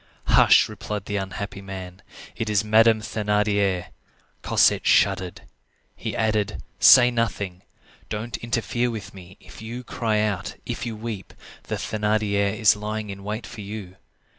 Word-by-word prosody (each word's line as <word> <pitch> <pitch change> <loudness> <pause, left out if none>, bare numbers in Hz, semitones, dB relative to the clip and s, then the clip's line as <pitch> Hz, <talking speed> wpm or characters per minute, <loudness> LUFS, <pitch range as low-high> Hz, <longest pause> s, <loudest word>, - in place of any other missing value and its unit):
"Hush!" - - +6
replied 105 -2 -6
the 105 - -2
unhappy 100 +1 -5
man; 95 -1 -8 0.3
"it 110 - -3
is 105 -1 +2
Madame 110 +1 +4
Thénardier." 105 -4 0 0.5
Cosette - - +3
shuddered. 90 -2 +2 0.5
He - - -5
added:— 105 -2 -1 0.2
"Say 125 -1 +8
nothing. 100 -6 -2 0.5
Don't 110 +2 -4
interfere 120 +1 -1
with 110 -4 -7
me. 95 0 -13
If - - -14
you 120 +3 -6
cry 110 -3 -1
out, 105 -3 -2
if - - -4
you 115 - -4
weep, 110 -3 -7 0.3
the - - -3
Thénardier 105 -1 0
is 110 -2 +5
lying 105 0 -4
in 100 0 -9
wait 105 +3 -4
for 115 - -9
you. 100 -2 -8
105 Hz, 140 wpm, -24 LUFS, 100-110 Hz, 0.5 s, Say